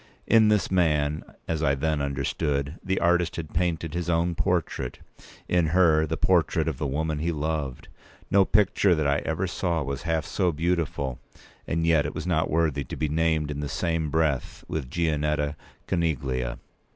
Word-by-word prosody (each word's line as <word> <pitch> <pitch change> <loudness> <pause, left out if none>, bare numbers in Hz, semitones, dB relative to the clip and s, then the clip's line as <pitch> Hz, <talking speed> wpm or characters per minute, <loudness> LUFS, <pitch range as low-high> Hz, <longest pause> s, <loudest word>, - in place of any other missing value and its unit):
In 110 -1 +5
this 105 -3 +2
man, 75 -5 +2 0.2
as 80 -1 -1
I 70 -3 +2
then 75 +1 0
understood, 70 +2 -2
the 95 0 0
artist 85 -1 +2
had 80 -3 -6
painted 85 -2 -1
his 85 0 -2
own 85 +1 +1
portrait; 80 -7 -1 0.5
in 85 -2 +2
her, 80 -2 +4
the 80 +2 -2
portrait 80 -3 +2
of 80 -5 -2
the 75 - -1
woman 75 +2 -1
he 85 +3 0
loved. 75 -4 -3 0.4
No 100 0 +6
picture 100 -2 +3
that 80 -2 0
I 70 +1 +2
ever 80 +4 -2
saw 85 -3 -1
was 70 0 -4
half 80 -3 -1
so 90 -3 0
beautiful, 80 -5 -1 0.5
and 80 0 0
yet 80 -3 +3
it 75 - -7
was - - -4
not 80 -3 +1
worthy 80 -3 +1
to - - -6
be 75 - -1
named 80 -1 +1
in 70 - -4
the 75 -1 -3
same 80 -1 -1
breath 75 -4 -1
with 75 -6 -4
Gianetta 75 -2 0 0.3
Coneglia. 65 -8 -1
80 Hz, 175 wpm, -26 LUFS, 75-85 Hz, 0.5 s, No